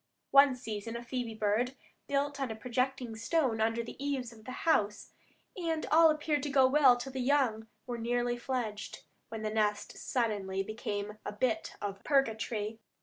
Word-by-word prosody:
One 275 -1 +7
season 225 -2 -5
a 235 - -5
phoebe 240 -2 -4
bird 220 +5 +1 0.3
built 280 0 0
on 265 - -1
a 220 - -4
projecting 250 0 -2
stone 230 -1 +1
under 225 +1 +1
the 240 +3 -8
eaves 265 -4 -2
of 220 -1 -16
the 255 - -6
house, 210 -10 +1 0.4
and 330 -3 -2
all 325 +1 +7
appeared 305 -1 +1
to 290 - -3
go 270 -1 +5
well 260 -2 +6
till 255 +2 -6
the 260 0 -3
young 250 -5 +2 0.2
were 240 -2 -4
nearly 240 +1 0
fledged, 240 -4 -4 0.3
when 220 -1 -6
the 215 - -1
nest 210 -1 0
suddenly 200 -6 -1
became 210 0 -4
a - - -4
bit 220 +1 -1
of 200 -1 -4
purgatory. 225 -5 0
240 Hz, 170 wpm, -31 LUFS, 220-270 Hz, 0.4 s, One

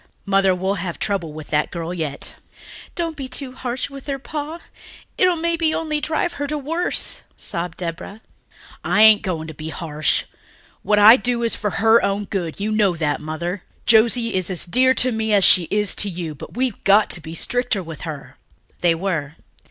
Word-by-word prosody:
Mother, 195 -1 +3
we'll 190 +1 -2
have 175 -3 -4
trouble 190 -6 -2
with 155 0 -10
that 150 0 +1
girl 170 0 -5
yet." 155 -5 -3 0.6
"Don't 335 -2 -3
be 270 -3 -6
too 255 +1 -5
harsh 255 -1 -4
with 275 0 -11
her, 275 -1 -2
Pa... 300 +4 -6 0.6
it'll 365 -1 +3
maybe 330 -1 0
only 305 -2 -2
drive 315 +3 -1
her 285 - -1
to 300 +1 -2
worse," 325 +5 -2 0.2
sobbed 170 -1 -4
Deborah. 175 +5 -6 0.6
"I 215 - +3
ain't 220 -1 +7
going 170 -5 -3
to 160 - -7
be 155 +1 -7
harsh. 155 -4 -1 0.6
What 210 +2 +1
I 215 +4 +9
do 245 -2 -1
is 230 - +1
for 210 - -2
her 225 +3 +4
own 200 +1 0
good, 180 -5 -4
you 210 +2 -2
know 205 -4 +2
that, 150 -3 -1
Mother. 170 +5 -4 0.2
Josie 230 0 +4
is 185 -1 0
as 180 -3 +3
dear 255 +8 +3
to 255 +2 +2
me 220 -1 -1
as 200 -2 +4
she 180 -1 +7
is 210 -1 +1
to 205 - +2
you, 170 -3 -5
but 150 - -11
we've 255 -4 -2
got 205 +2 +4
to 170 - -3
be 160 +1 -8
stricter 245 0 0
with 160 -3 -9
her." 150 -3 -8 0.4
They 170 -2 +3
were. 165 -5 -3
205 Hz, 190 wpm, -21 LUFS, 170-255 Hz, 0.6 s, I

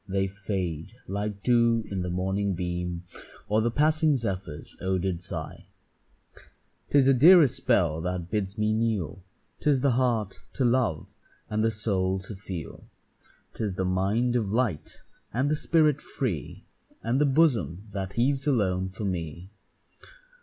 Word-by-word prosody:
They 95 0 0
fade 95 -4 -4
like 100 0 -4
dew 115 -2 +3
in 95 -2 -2
the 90 - -3
morning 95 +2 -1
beam, 90 0 -3 0.4
Or 105 +1 +2
the 120 - +1
passing 155 +3 +3
zephyr's 95 - -4
odour'd 95 -2 -1
sigh. 90 - -6 1.2
'Tis 140 -2 +4
a 135 - +6
dearer 165 +6 +8
spell 85 - +1
that 90 0 -4
bids 105 -1 -2
me 105 0 +1
kneel, 110 -5 -1 0.4
'Tis 140 -3 +2
the 140 -1 +3
heart 115 -5 0
to 135 - 0
love, 120 -10 0 0.4
and 110 0 +1
the 115 - +3
soul 95 -3 0
to 95 +2 -8
feel: 90 -5 -7 0.7
'Tis 105 -4 -3
the 95 - -1
mind 100 +7 +1
of 110 -5 0
light, 115 -8 -2 0.3
and 130 +6 0
the - - +3
spirit 150 -2 +2
free, 90 - -4 0.4
And 120 +5 +1
the - - +5
bosom 115 - +2
that 95 -1 -4
heaves 135 +4 +1
alone 95 -8 +1
for 100 +3 -6
me. 85 0 -4
105 Hz, 145 wpm, -27 LUFS, 95-125 Hz, 1.2 s, dearer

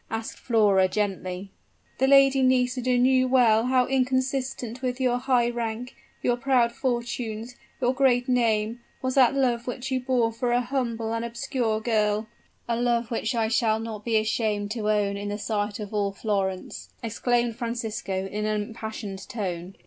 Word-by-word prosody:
asked 225 0 -5
Flora, 205 -5 +3
gently. 190 -1 -3 0.5
"The 265 - +3
Lady 275 -1 +6
Nisida 250 -1 +2
knew 255 +1 +4
well 240 -3 +4
how 255 -1 +3
inconsistent 260 -1 -1
with 250 0 -2
your 250 -1 +1
high 245 -2 +2
rank 235 +1 -4 0.3
your 245 -1 +2
proud 245 -2 +2
fortunes 240 -2 -3 0.2
your 250 0 +2
great 255 -2 +3
name, 230 -2 +1 0.2
was 260 0 0
that 265 0 +5
love 245 -3 +1
which 250 +1 -4
you 260 - +1
bore 245 -3 +1
for 240 +1 -1
a 245 - +4
humble 235 -3 -2
and 230 0 -2
obscure 235 -2 -1
girl 215 -1 +1 0.2
" - - -41
"A 235 - 0
love 240 -1 +1
which 230 +1 -1
I 225 -1 +1
shall 220 -1 +2
not 220 -2 -6
be 225 -1 +1
ashamed 215 -1 0
to 215 -2 -2
own 205 -1 +1
in 205 0 -4
the 205 - -3
sight 210 -1 -2
of 210 0 -7
all 200 -1 0
Florence," 195 -2 -3
exclaimed 235 +1 0
Francisco 225 -5 -3
in 210 +2 -3
an 215 -1 0
impassioned 220 -3 -7
tone. 185 -4 -4
235 Hz, 165 wpm, -26 LUFS, 215-250 Hz, 0.5 s, Lady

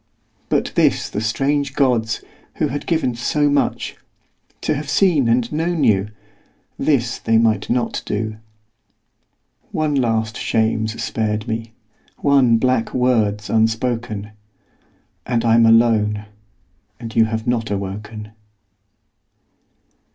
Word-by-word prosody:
But - - 0
this - - +2
the 105 - -2
strange 135 +5 0
gods, 120 -5 +1 0.3
who - - 0
had 145 +3 -5
given 160 -7 +1
so 145 +5 +1
much, 145 - 0 0.7
To - - 0
have 145 0 -5
seen 160 -7 +3
and 120 0 +1
known 165 +1 -1
you, 100 -1 +2 0.7
this 125 -5 +1
they 115 - +2
might 110 -3 +1
not 120 0 0
do. 110 +1 -3 1.3
One 155 -1 0
last 110 -5 0
shame's 110 0 0
spared 110 0 -2
me, 115 0 -4 0.4
one 135 -5 +4
black 125 -1 0
word's 110 -5 +1
unspoken; 110 -1 -1 1.0
And 120 -1 0
I'm 115 0 +5
alone; 110 -2 +3 0.7
and 115 -2 -8
you 115 - +5
have 110 0 -3
not 120 -2 -1
awoken. 105 +2 -5
115 Hz, 115 wpm, -20 LUFS, 110-130 Hz, 1.3 s, I'm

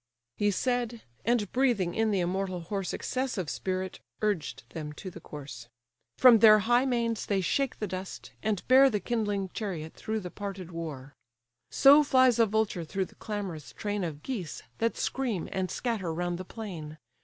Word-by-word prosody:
He 205 - +2
said; 240 +2 -1 0.2
and 225 -3 +1
breathing 240 -9 +2
in 220 0 +1
the 195 -3 +1
immortal 185 0 -1
horse 195 +2 -3
Excessive 250 - -2
spirit, 185 0 -3 0.2
urged 205 -8 -1
them 150 -2 -6
to 185 +5 -8
the 170 - -10
course; 140 -7 -9 0.5
From 245 -3 +8
their 215 -1 +9
high 245 +3 +4
manes 235 -3 0
they 200 -2 +1
shake 270 +8 0
the 215 - -2
dust, 185 0 -6
and 210 -4 -1
bear 265 +2 +7
The 210 -4 0
kindling 205 -5 -1
chariot 170 -7 -4
through 220 0 -3
the 180 -2 -7
parted 195 -3 -6
war: 150 -5 -6 0.6
So 285 +2 +7
flies 255 -4 +4
a 230 - +6
vulture 210 -4 0
through 190 +4 -2
the - - -17
clamorous 195 -8 -5
train 205 -2 -2
Of 150 -4 -5
geese, 200 - -5 0.2
that 230 0 0
scream, 240 -10 -1
and 190 -1 -1
scatter 220 -9 -2
round 175 +1 -2
the 185 - -6
plain. 170 -9 -7
200 Hz, 170 wpm, -29 LUFS, 175-230 Hz, 0.6 s, their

